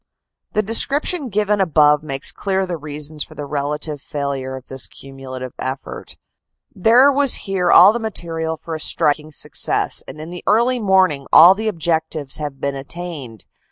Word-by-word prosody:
The 215 - +1
description 280 - +2
given 210 0 0
above 150 -4 +3
makes 135 -3 -3
clear 190 -1 -2
the 180 -2 -4
reasons 150 0 -5
for - - -15
the 145 - -6
relative 150 +1 -3
failure 140 -2 -4
of 130 -1 -11
this 130 0 -2
cumulative 130 -2 -9
effort. 130 +1 -6 0.6
There 240 +8 +5
was 280 -1 +4
here 190 -3 -1
all 205 - +8
the 235 - -2
material 165 -7 -4
for 165 - -8
a 160 - -4
striking 150 0 +1
success, - - -2
and - - -10
in 160 +2 -8
the 180 - -8
early 240 +4 +2
morning 190 - +2
all 175 +4 +9
the 220 +3 -4
objectives 160 -6 -1
had 145 -3 -6
been 140 0 -2
attained. 140 - -8
160 Hz, 160 wpm, -19 LUFS, 140-195 Hz, 0.6 s, all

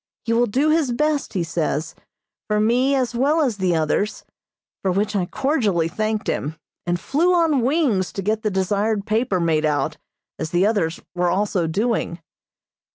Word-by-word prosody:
He 230 - +1
will 240 +1 +3
do 270 +9 +1
his 310 -5 +2
best, 300 +4 0
he 185 -4 0
says, 160 -2 -2 0.5
for 210 0 +1
me 250 +6 +3
as 255 -2 0
well 280 +7 +2
as 250 -8 0
the 185 -3 +1
others, 160 +6 0 0.6
for 190 - +1
which 205 +3 0
I 180 -3 0
cordially 215 - +1
thanked 215 +4 -2
him, 150 +3 -2 0.3
and 175 0 0
flew 335 - +2
on 320 -6 +3
wings 250 - +1
to 195 - -4
get 215 +2 0
the 215 - 0
desired 200 +2 0
paper 215 -3 0
made 160 -2 +1
out, 150 -2 0 0.4
as 160 - -3
the 175 +3 +2
others 200 -7 0
were 180 0 +1
also 185 -2 0
doing. 205 0 -1
210 Hz, 170 wpm, -22 LUFS, 175-250 Hz, 0.6 s, will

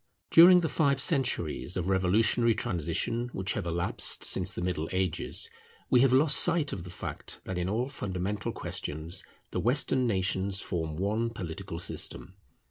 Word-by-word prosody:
During 180 +2 +8
the 165 - 0
five 140 -4 +1
centuries 120 - -1
of 90 0 -2
revolutionary 105 +5 +2
transition 90 +8 -2
which 95 +1 -2
have - - -4
elapsed 85 +1 +1
since 95 0 +2
the 90 - -5
Middle 85 -3 -2
Ages, 95 -3 -1 0.4
we 125 - +6
have 135 -1 +4
lost 135 +3 +5
sight 165 -4 +2
of 95 -3 -6
the - - -8
fact 90 - -7
that 95 -1 -4
in 90 +1 -2
all 115 +5 -1
fundamental 100 -5 -4
questions 80 +4 -4 0.3
the - - -2
Western 125 +1 +2
nations 95 -1 0
form 80 -5 -4
one 105 +5 -1
political 90 -4 -6
system. 90 +1 -2
95 Hz, 155 wpm, -29 LUFS, 90-120 Hz, 0.4 s, During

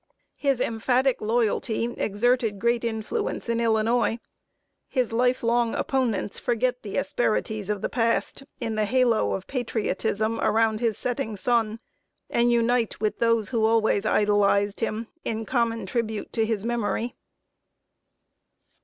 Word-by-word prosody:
His 275 -3 +1
emphatic 250 +3 +1
loyalty 225 0 0
exerted 225 +1 +1
great 235 +3 +1
influence 235 - -3
in 230 0 +1
Illinois. 225 0 +2 0.7
His 250 -4 -1
life 250 +2 +2
long 235 0 +2
opponents 240 -7 -1
forget 250 +1 0
the 205 - -5
asperities 220 -7 -1
of 205 -2 -2
the - - +1
past, 230 +2 0 0.2
in 230 -2 -2
the 215 0 +1
halo 240 0 +2
of 190 - -4
patriotism 225 -3 -1
around 220 0 +2
his 230 -3 0
setting 245 -3 -2
sun, 225 +1 0 0.5
and 240 0 +3
unite, 235 0 +1
with 215 0 -1
those 230 -3 +2
who 230 -3 0
always 220 -2 +2
idolized 205 -1 +2
him, 225 0 -2 0.2
in 225 0 -3
common 230 -2 0
tribute 220 +1 -3
to 225 -1 +1
his 220 -2 -1
memory. 235 0 -1
230 Hz, 130 wpm, -25 LUFS, 215-240 Hz, 0.7 s, and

